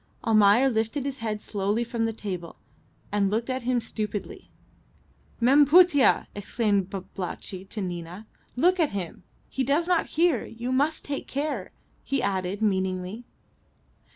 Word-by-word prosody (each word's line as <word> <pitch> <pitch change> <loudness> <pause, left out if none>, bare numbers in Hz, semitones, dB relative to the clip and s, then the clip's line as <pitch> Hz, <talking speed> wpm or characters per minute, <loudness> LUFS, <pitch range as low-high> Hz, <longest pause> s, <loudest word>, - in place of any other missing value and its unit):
Almayer 215 +3 +5
lifted 230 +3 -1
his 275 -1 -4
head 215 -2 -3
slowly 205 +3 -1
from 235 -1 -2
the 225 - 0
table, 185 -6 -6 0.6
and 200 -1 +2
looked 225 +5 -1
at 260 0 -2
him 245 0 +1
stupidly. 220 - -5 0.9
"Mem 270 +5 +6
Putih!" 325 -3 +5
exclaimed 205 -2 0
Babalatchi 190 0 -6
to 215 - -5
Nina, 175 +2 -6 0.3
"look 360 +8 +3
at 315 -8 +2
him. 175 -4 -6 0.3
He 265 - -2
does 290 +6 +1
not 355 -2 +2
hear. 330 -8 +3
You 235 +3 -5
must 290 +5 +1
take 285 -1 -4
care," 280 -8 -3 0.3
he 275 0 -1
added 190 0 -1
meaningly. 190 +2 -1
225 Hz, 140 wpm, -26 LUFS, 200-270 Hz, 0.9 s, Mem